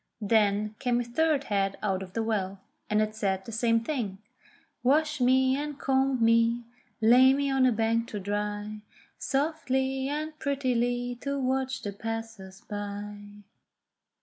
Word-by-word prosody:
Then 210 Hz, 0 st, +2 dB
came 245 Hz, -2 st, +1 dB
a -, -, 0 dB
third 285 Hz, +4 st, +1 dB
head 195 Hz, -4 st, 0 dB
out 195 Hz, -2 st, 0 dB
of 185 Hz, -1 st, -9 dB
the 225 Hz, -, -1 dB
well, 200 Hz, -3 st, -2 dB, 0.3 s
and 215 Hz, 0 st, +3 dB
it 215 Hz, 0 st, -3 dB
said 190 Hz, -3 st, -1 dB
the -, -, -7 dB
same 230 Hz, 0 st, +2 dB
thing: 230 Hz, -7 st, -3 dB, 0.6 s
"Wash 300 Hz, +2 st, +2 dB
me, 260 Hz, +1 st, +4 dB
and 290 Hz, 0 st, -4 dB
comb 265 Hz, -3 st, +2 dB
me, 230 Hz, +1 st, +3 dB, 0.4 s
lay 250 Hz, +4 st, +7 dB
me 280 Hz, 0 st, 0 dB
on 265 Hz, -1 st, +4 dB
a -, -, +4 dB
bank 230 Hz, +1 st, +1 dB
to 210 Hz, -, -5 dB
dry 205 Hz, +1 st, -3 dB, 0.4 s
Softly 270 Hz, -2 st, 0 dB
and 305 Hz, +1 st, -4 dB
prettily 245 Hz, -3 st, -1 dB
to 280 Hz, 0 st, -2 dB
watch 260 Hz, 0 st, -1 dB
the 205 Hz, -, -4 dB
passers 225 Hz, -3 st, -6 dB
by." 205 Hz, 0 st, -7 dB
230 Hz, 150 wpm, -28 LUFS, 210-265 Hz, 0.6 s, lay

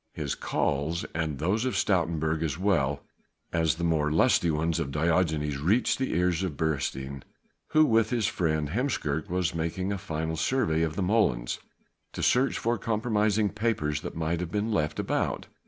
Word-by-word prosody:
His -, -, -3 dB
calls 75 Hz, +5 st, -1 dB
and 80 Hz, -3 st, -2 dB
those 95 Hz, -, 0 dB
of 130 Hz, -, -1 dB
Stoutenburg 80 Hz, -4 st, +1 dB
as 80 Hz, -3 st, -1 dB
well 75 Hz, -8 st, +1 dB, 0.5 s
as 80 Hz, -1 st, +2 dB
the 85 Hz, -, -5 dB
more 80 Hz, -3 st, +2 dB
lusty 85 Hz, +2 st, +3 dB
ones 80 Hz, +2 st, 0 dB
of 80 Hz, -5 st, -2 dB
Diogenes 80 Hz, -2 st, +1 dB
reached 100 Hz, -, +2 dB
the 130 Hz, -, -1 dB
ears 90 Hz, -1 st, +1 dB
of 90 Hz, -7 st, -3 dB
Beresteyn, 70 Hz, -3 st, -2 dB, 0.5 s
who 155 Hz, 0 st, +5 dB
with 115 Hz, -4 st, +3 dB
his 120 Hz, -4 st, 0 dB
friend 80 Hz, -5 st, 0 dB
Heemskerk 80 Hz, -, -1 dB
was 90 Hz, -1 st, 0 dB
making 85 Hz, +4 st, -2 dB
a 100 Hz, -, -4 dB
final 80 Hz, -3 st, -3 dB
survey 80 Hz, -4 st, +1 dB
of 80 Hz, -1 st, -1 dB
the 100 Hz, -, -1 dB
molens, 90 Hz, -, +1 dB, 0.5 s
to -, -, -4 dB
search 130 Hz, +2 st, +3 dB
for 115 Hz, -1 st, 0 dB
compromising 110 Hz, -1 st, +1 dB
papers 100 Hz, -10 st, -1 dB
that -, -, -6 dB
might 80 Hz, +1 st, -1 dB
have 85 Hz, -1 st, -4 dB
been 105 Hz, +2 st, -1 dB
left 75 Hz, -8 st, 0 dB
about. -, -, -1 dB
85 Hz, 170 wpm, -28 LUFS, 75-105 Hz, 0.5 s, who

